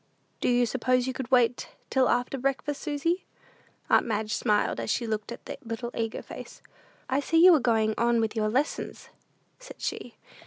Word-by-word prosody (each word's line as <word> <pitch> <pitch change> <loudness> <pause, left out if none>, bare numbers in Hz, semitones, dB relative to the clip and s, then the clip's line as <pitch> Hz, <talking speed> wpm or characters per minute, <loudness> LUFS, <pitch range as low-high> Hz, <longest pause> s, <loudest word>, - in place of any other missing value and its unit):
"Do - - +1
you 245 0 +3
suppose 255 +1 +1
you 260 - -2
could 260 -1 -5
wait 245 -2 +2 0.2
till 260 -2 +3
after 250 +2 0
breakfast, 275 +2 -2
Susy?" 330 +4 -1 0.6
Aunt - - +4
Madge 215 -1 -2
smiled 210 - +1
as 115 - -4
she 240 - 0
looked 215 0 -3
at 235 - -9
the - - -7
little 230 +1 -5
eager 225 -1 -3
face. - - -10 0.4
"I 265 - +1
see 320 +3 0
you 370 - +10
are 315 - +5
going 225 -3 +2
on 235 0 +3
with 225 0 -1
your 215 -1 +1
lessons," 270 +7 -2 0.5
said - - -12
she. - - -5
245 Hz, 185 wpm, -27 LUFS, 225-270 Hz, 0.6 s, you